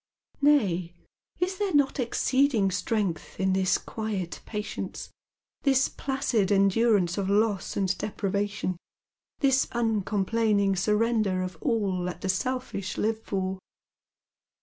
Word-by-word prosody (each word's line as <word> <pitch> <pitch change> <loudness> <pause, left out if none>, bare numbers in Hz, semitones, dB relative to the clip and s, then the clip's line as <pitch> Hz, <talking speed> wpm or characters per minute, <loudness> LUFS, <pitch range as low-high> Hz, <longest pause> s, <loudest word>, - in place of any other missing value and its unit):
Nay, 185 - +2 0.4
is 370 +1 -1
there 400 -6 0
not 285 -1 +3
exceeding 250 -3 +2
strength 185 -2 -2
in 190 0 +2
this 190 0 +2
quiet 205 -6 -4
patience, 210 -1 -5 0.5
this 270 -2 +3
placid 255 -7 -1
endurance 200 -2 +3
of 195 -1 -1
loss 205 -1 +1
and 195 -1 +1
depriva 200 +1 -1
tion, 185 -3 -3 0.6
this 270 -2 +3
uncomplaining 210 -2 +1
surrender 210 -1 +1
of 185 0 -5
all 205 -8 0
that 180 - -5
the 190 - -2
selfish 250 -2 -2
live 220 +1 0
for 190 -3 -3
205 Hz, 115 wpm, -27 LUFS, 190-235 Hz, 0.6 s, not